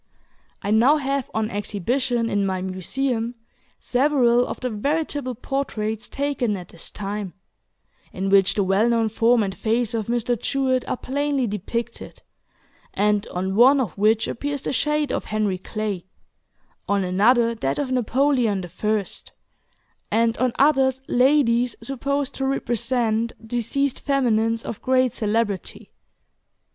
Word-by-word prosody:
I 205 - -1
now 245 +8 +5
have 275 -2 -2
on 220 0 -1
exhibition 230 +4 -1
in 205 -2 0
my 190 -1 -1
Museum 225 +6 -2 0.4
several 250 -2 +2
of - - -5
the 250 -1 -3
veritable 285 +2 -2
portraits 220 -4 -3
taken 275 -7 -1
at 180 -2 -10
this 170 - -7
time, 200 -2 -5 0.8
in 195 +1 -3
which 195 -1 +5
the 205 - +2
well 195 +5 +2
known 230 -2 +2
form 230 +1 +3
and 195 -1 -3
face 230 +1 0
of 220 -3 -2
Mr. 240 0 -1
Jewett 260 -2 0
are - - -1
plainly 280 0 -1
depicted, 220 +3 -5 0.7
and 205 0 +1
on 190 +2 -3
one 260 +5 +6
of 230 -11 -2
which 215 +2 +2
appears 285 +2 -3
the - - -2
shade 300 +1 0
of - - -2
Henry 210 -3 -1
Clay, 205 -3 -4 0.8
on 200 -1 +2
another 230 +6 +3
that 135 -11 -2
of 265 -3 -2
Napoleon 250 -4 +1
the 175 - -8
First, 210 +3 -3 0.8
and 230 0 +2
on 255 0 +2
others 265 -2 +3
ladies 250 -2 +3
supposed 280 +1 -2
to 270 - -2
represent 235 -3 0
deceased 245 +4 -1
feminines 230 -5 +1
of 215 - -6
great 255 -2 +2
celebrity. 210 -3 -2
235 Hz, 135 wpm, -23 LUFS, 210-265 Hz, 0.8 s, one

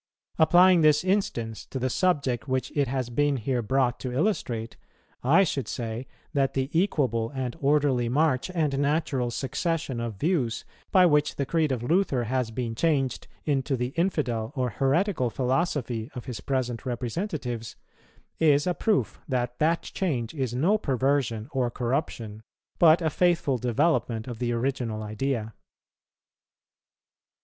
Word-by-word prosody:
Applying 175 +2 +6
this 150 0 +4
instance 150 - -1
to - - -5
the 130 0 0
subject 140 -7 0
which 130 -1 -2
it 145 -2 +2
has 130 -1 -2
been 145 +2 +1
here 125 +1 -1
brought 125 +2 +1
to 130 - -4
illustrate, 125 - -1 0.5
I 155 +10 +5
should 135 - -2
say 115 +2 -4 0.3
that 135 -2 +1
the 135 +1 -1
equable 130 - +1
and 130 -2 -3
orderly 140 -5 +2
march 135 0 +1
and 150 -5 +1
natural 140 -4 0
succession 140 +2 -2
of 115 -2 -4
views, 130 - -1 0.3
by 185 -1 +6
which 150 -3 +2
the 140 - -1
creed 155 0 +1
of 120 -3 -2
Luther 155 -4 +1
has 125 0 -1
been 115 0 -3
changed 135 0 0 0.2
into 135 -2 0
the 125 +1 -1
infidel 130 - -1
or 125 -3 -1
heretical 140 - +1
philosophy 130 -3 -1
of 125 - -6
his 125 -5 -5
present 125 -4 -2
representatives, 125 - -4 0.6
is 145 -2 +4
a 180 - +1
proof 210 +3 0
that 125 -3 -2
that 165 +2 +2
change 130 - -2
is 130 -6 -2
no 185 +12 +2
perversion 130 - 0
or 130 -3 0
corruption, 120 -4 -3 0.4
but 165 0 +6
a 160 - +1
faithful 170 -6 +2
development 120 -2 +1
of 120 -3 -6
the 120 -1 -1
original 120 -3 -2
idea. 110 +1 -2
130 Hz, 145 wpm, -26 LUFS, 120-155 Hz, 0.6 s, Applying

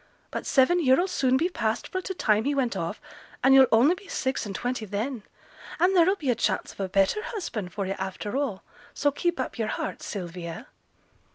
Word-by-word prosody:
But - - -4
seven 330 +6 +4
year 260 -1 +5
'll 365 - +1
soon 260 -7 +2
be 325 +6 +2
past 225 -11 -2
fro' 370 - -2
t' 380 +1 -5
time 215 -6 +2
he 285 +1 +1
went 255 -4 0
off, - - -3 0.4
and 265 - +6
yo'll 265 -1 +8
only 245 +9 +5
be 390 +2 -11
six 260 -4 -2
and 195 - -6
twenty 245 -1 -2
then; 215 +5 -3 0.6
and 365 +3 +3
there'll 365 +2 +5
be 290 -10 0
a - - +1
chance - - -1
of - - -24
a 195 -1 -2
better 195 - +2
husband 240 - -5
for 200 -2 -3
yo' 190 - -2
after 190 +4 -4
all, 270 -9 -2 0.3
so 290 - +2
keep 345 +2 -1
up 255 - -4
yo'r 220 - 0
heart, - - -4
Sylvia.' 175 -3 -6
260 Hz, 210 wpm, -26 LUFS, 210-330 Hz, 0.6 s, yo'll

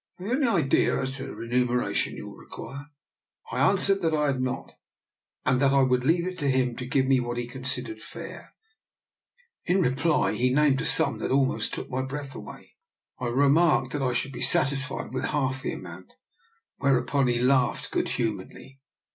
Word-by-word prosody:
Have 180 - -9
you 240 - 0
any 270 0 +2
idea 170 -12 +2
as 135 0 -3
to 135 - -6
the - - -8
re 115 - -7
muneration 125 0 0
you - - -8
will - - -10
require 140 +1 -9 0.3
?»" - - -20
I 125 - -2
answered 195 +5 +3
that 160 -2 +1
I 150 -1 +1
had 135 -3 0
not, 130 +1 -3 0.7
and 130 0 +3
that 135 -1 +4
I 135 -1 +5
would 125 -1 +2
leave 170 +3 +3
it 185 0 -4
to 145 -2 +1
him 130 -2 +1
to 125 - -5
give 130 0 +2
me 130 -1 +3
what 120 -1 -3
he 120 - -2
considered 130 - -4
fair. - - -10 1.1
In 180 +2 +2
reply 160 +1 +2
he 125 +1 +1
named 140 0 +3
a - - -2
sum - - +2
that - - -2
almost 135 0 +1
took - - -6
my 130 +1 -1
breath 140 0 -6
away. - - -11 0.4
I 125 - -2
re 135 +4 +3
marked 160 +3 +3
that 145 - -2
I 125 -2 +1
should 135 +3 -1
be 125 - -7
satisfied 140 -1 0
with 130 - -2
half 130 -2 -1
the - - -2
amount, - - -10 0.6
whereupon 140 0 +2
he 120 -1 +1
laughed 125 0 +2
good - - 0
humouredly. 115 +4 -4
135 Hz, 195 wpm, -26 LUFS, 125-145 Hz, 1.1 s, I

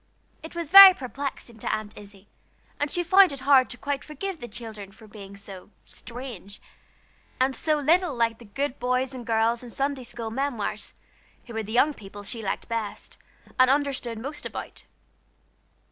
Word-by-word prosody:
It 320 +2 -11
was 335 -3 -5
very 390 -1 +12
perplexing 260 -4 -6
to - - -2
Aunt 215 -1 -4
Izzie, 205 -1 -14 0.5
and 290 - 0
she 350 +4 0
found 375 +1 +6
it 275 -2 -7
hard 265 -1 +5
to 245 - -6
quite 280 +1 -3
forgive 335 +4 -6
the 240 - -7
children 215 -5 -9
for 220 +2 -16
being 200 -2 -12
so 200 -2 -11 0.2
"unaccountable," 235 -5 -9 0.8
and 260 +1 +2
so 305 -1 0
little 325 +1 +2
like 230 -1 0
the 235 - -13
good 270 +6 -4
boys 255 +1 0
and 245 -3 -8
girls 230 +1 +1
in 245 - -9
Sunday 275 +1 -2
school 235 -2 -7
memoirs, 230 -5 -3 0.5
who 235 - -10
were 225 - -2
the 215 0 -8
young 270 +6 +3
people 205 -3 -11
she 225 +3 -5
liked 195 - -4
best, 225 -3 -5 0.4
and 255 0 +6
understood 270 -4 0
most 275 +7 -7
about. - - -8
245 Hz, 175 wpm, -25 LUFS, 220-285 Hz, 0.8 s, very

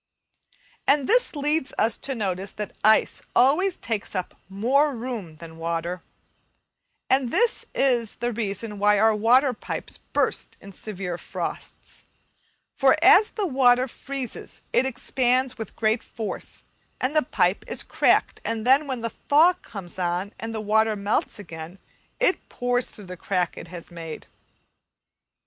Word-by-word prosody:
And 280 -1 +3
this 485 -6 +3
leads 295 0 0
us 225 0 +3
to 270 - -2
notice 195 -3 -2
that 210 -1 -6
ice 220 +1 +4
always 320 +9 +4
takes 215 -3 -3
up 185 -1 -3 0.2
more 265 +9 +2
room 225 -9 -5
than 160 0 -12
water, 170 +2 -3 1.1
and 265 -1 +2
that - - -9
this 475 0 +2
is 240 -5 +2
the 240 +1 -2
reason 210 -1 -3
why 205 0 +4
our 220 +1 +4
water 250 +5 +4
pipes - - -5
burst - - -1
in 200 - -12
severe 190 -3 -5
frosts; - - -6 0.7
for 270 +1 +5
as 410 +2 +7
the 420 - -2
water 255 -4 +4
freezes 265 0 -6
it 260 - +3
expands 255 0 0
with 220 - -7
great 220 +1 +1
force, 220 -2 -6 0.4
and 260 +4 -1
the 310 - +6
pipe 185 -7 +1
is - - -1
cracked, - - +2
and 225 -1 -3
then 275 +4 +4
when 260 -3 -3
the 230 0 -3
thaw 315 +10 +4
comes 200 - -10
on, 180 +3 -1
and 225 0 -5
the - - -2
water 220 +1 +2
melts 200 +2 -1
again, 170 -2 -9 0.4
it - - +1
pours 245 0 0
through 205 - -12
the 180 0 -8
crack 180 -1 -1
it - - -9
has 175 0 -8
made. 165 -2 -8
225 Hz, 150 wpm, -24 LUFS, 195-265 Hz, 1.1 s, as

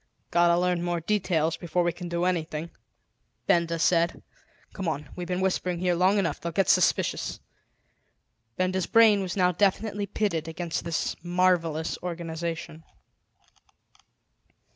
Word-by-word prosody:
"Got 175 0 +4
to 170 0 +4
learn 180 -1 +1
more 175 0 -1
details 165 -4 0
before 175 +1 -1
we 175 - +1
can 175 0 -8
do 170 +1 -1
anything," 165 -2 -2 0.7
Benda 170 -1 +2
said. 170 +1 +1 0.5
"Come 190 -3 -4
on; 150 -3 -3
we've 180 -1 -5
been 180 0 -2
whispering 180 -1 0
here 180 0 +1
long 185 +4 +3
enough; 190 -4 -1
they'll 170 - -3
get 190 +3 +1
suspicious." - - +2 1.2
Benda's 185 0 0
brain 220 -3 +5
was 185 0 -4
now 180 -1 +4
definitely 205 +2 0
pitted 185 -6 -1
against 165 0 -4
this 165 -3 -1
marvelous 175 -2 +1
organisation. 165 -2 -5
175 Hz, 135 wpm, -27 LUFS, 165-185 Hz, 1.2 s, brain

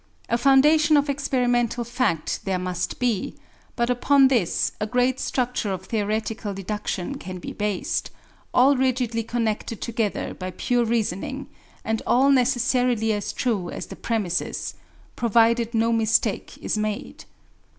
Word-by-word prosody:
A 235 - +2
foundation 300 +4 +5
of 285 0 +2
experimental 245 -3 0
fact 235 -9 -1
there 190 -2 -1
must 180 0 -3
be; 235 -6 -1 0.4
but 235 0 +1
upon 265 +2 +4
this 225 -10 +1
a 210 - -1
great 250 +2 +1
structure 250 -5 -1
of 190 0 -5
theoretical 215 -1 -2
deduction 195 -2 -4
can 185 0 -7
be 175 - -7
based, 205 -3 -2 0.4
all 270 +3 +5
rigidly 250 -3 0
connected 225 -1 -2
together 225 -3 -2
by 185 0 -6
pure 240 +6 0
reasoning, 220 -5 -2 0.4
and 220 0 -1
all 270 +3 +4
necessarily 245 -3 +2
as 205 -1 -3
true 205 -8 -1
as - - -6
the - - -9
premises, 205 -7 -2 0.4
provided 235 0 +3
no 230 +1 +2
mistake 225 -2 +1
is 215 - -2
made. 215 -1 -4
230 Hz, 135 wpm, -24 LUFS, 210-250 Hz, 0.4 s, foundation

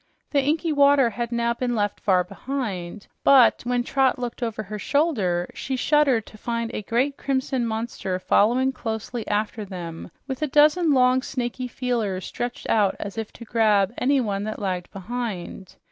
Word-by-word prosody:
The 280 - +3
inky 310 +3 0
water 280 -4 +5
had 235 +2 -4
now 235 0 +1
been 245 0 -2
left 205 -2 -1
far 185 -3 +3
behind, 200 -3 -5 0.2
but 265 -4 +6
when 245 0 +1
Trot 265 0 +2
looked 245 0 -5
over 225 -2 -2
her 210 +1 -6
shoulder, 205 - +1
she 265 - -3
shuddered 270 -4 +2
to 215 - -14
find 230 0 -2
a - - -3
great 250 +7 0
crimson 260 -2 -1
monster 220 -4 -3
following 240 +8 +3
closely 225 -1 -5
after 210 +1 -1
them, 175 -5 -7 0.2
with 265 -1 -5
a 305 - +1
dozen 300 +4 +4
long, 255 -1 +4
snaky 250 -1 -3
feelers 230 -7 -2
stretched 245 0 -5
out 205 -3 +2
as 200 - -5
if 225 -1 -5
to 235 - -11
grab 215 -3 +2
anyone 245 -7 +1
that 215 - -4
lagged 185 -3 -3
behind. 195 -3 -6
235 Hz, 165 wpm, -24 LUFS, 205-260 Hz, 0.2 s, but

